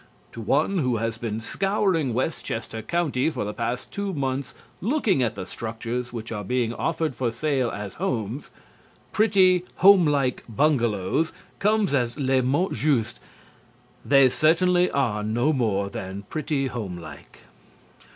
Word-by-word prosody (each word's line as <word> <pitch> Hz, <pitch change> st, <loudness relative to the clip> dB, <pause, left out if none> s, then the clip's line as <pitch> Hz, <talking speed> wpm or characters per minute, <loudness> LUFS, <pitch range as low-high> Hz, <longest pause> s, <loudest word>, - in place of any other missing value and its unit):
To 115 Hz, -, -8 dB
one 150 Hz, -, +1 dB
who 125 Hz, -5 st, +1 dB
has 115 Hz, +1 st, -3 dB
been 110 Hz, -2 st, -3 dB
scouring 185 Hz, -, 0 dB
Westchester 115 Hz, -5 st, -3 dB
County 150 Hz, +1 st, 0 dB
for 155 Hz, -, -3 dB
the 105 Hz, -, -4 dB
past 120 Hz, +2 st, -3 dB
two 200 Hz, -2 st, -3 dB
months 135 Hz, -1 st, -2 dB, 0.3 s
looking 215 Hz, -, +1 dB
at 115 Hz, -3 st, 0 dB
the 95 Hz, -, -5 dB
structures 115 Hz, +4 st, -5 dB
which 115 Hz, -1 st, -6 dB
are 105 Hz, -2 st, -4 dB
being 120 Hz, +2 st, 0 dB
offered 160 Hz, +2 st, -1 dB
for 125 Hz, -1 st, -1 dB
sale 130 Hz, 0 st, 0 dB
as 100 Hz, -2 st, -6 dB
homes, 125 Hz, -, -3 dB, 0.6 s
"pretty 190 Hz, -4 st, +4 dB
home 190 Hz, -3 st, +7 dB
like 140 Hz, -4 st, 0 dB
bungalows" 120 Hz, -, +1 dB, 0.3 s
comes 210 Hz, -4 st, +2 dB
as 120 Hz, -2 st, 0 dB
le 135 Hz, -2 st, +2 dB
mot 145 Hz, +9 st, +1 dB
juste. 135 Hz, -8 st, 0 dB, 0.8 s
They 135 Hz, -1 st, +6 dB
certainly 175 Hz, +5 st, +3 dB
are 120 Hz, -7 st, 0 dB
no 120 Hz, +8 st, +1 dB
more 105 Hz, -7 st, 0 dB
than 95 Hz, +1 st, -6 dB
pretty 150 Hz, -3 st, -1 dB
home 110 Hz, -9 st, -4 dB
like. 75 Hz, -4 st, -12 dB
130 Hz, 140 wpm, -25 LUFS, 115-160 Hz, 0.8 s, home